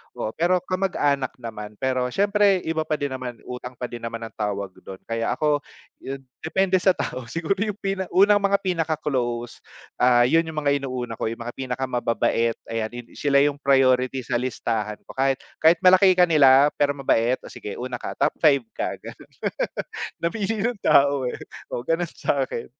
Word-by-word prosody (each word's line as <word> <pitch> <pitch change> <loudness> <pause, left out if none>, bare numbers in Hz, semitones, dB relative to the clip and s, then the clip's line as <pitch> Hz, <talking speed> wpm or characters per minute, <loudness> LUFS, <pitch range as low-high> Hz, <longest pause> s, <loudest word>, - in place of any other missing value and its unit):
oo, - - -3
pero 180 +2 +2
kamag-anak 145 -8 0
naman. 105 -3 -7
Pero 130 -1 0
siyempre, 200 0 +3
iba 160 -1 0
pa 155 - +1
din 145 -1 -2
naman, 125 -2 -6
utang 125 0 -7
pa 125 - -3
din 120 - -6
naman 115 0 -5
ang 110 - -7
tawag 100 -2 -2
do'n, 95 -1 -11
kaya 115 0 -2
ako, 150 -1 +1 0.8
depende 185 +3 +1
sa 190 0 +3
tao, 125 -2 -4
siguro, 165 +7 -2
yung 210 0 -2
pina 195 -2 -2
unang 205 +2 +5
mga 200 0 +2
pinaka-close, 150 -9 -2 0.4
ah, 120 -1 +5
'yon 165 +6 +3
yung 155 -1 -4
mga 140 0 +2
inuuna 125 -4 -5
ko, - - -1
yung 115 +1 -5
mga 120 - -7
pinakamababait, 125 -3 0 0.2
ayan, 115 -1 -1
hin 120 0 -9
sila 140 -1 +4
yung 145 -1 0
priority 130 -2 +3
sa 120 - -1
listahan 110 -4 -2
ko, - - -12
kahit, 135 0 +1 0.2
kahit 160 +2 +6
malaki 185 0 +7
kanila, 145 -5 +6
pero 145 0 +2
mabait, 125 -3 +2
"O - - -10
sige 105 - -7
una 125 0 -5
ka, - - -6
top - - +2
5 140 -5 +4
ka", - - -3
gano'n, - - -11 0.9
namili 210 +5 -1
ng 235 +2 0
tao, 140 -1 +4
eh, - - -6 0.3
o 120 - -4
gano'n 170 +1 0
sa'kin. 135 -4 -2
135 Hz, 175 wpm, -24 LUFS, 120-170 Hz, 0.9 s, malaki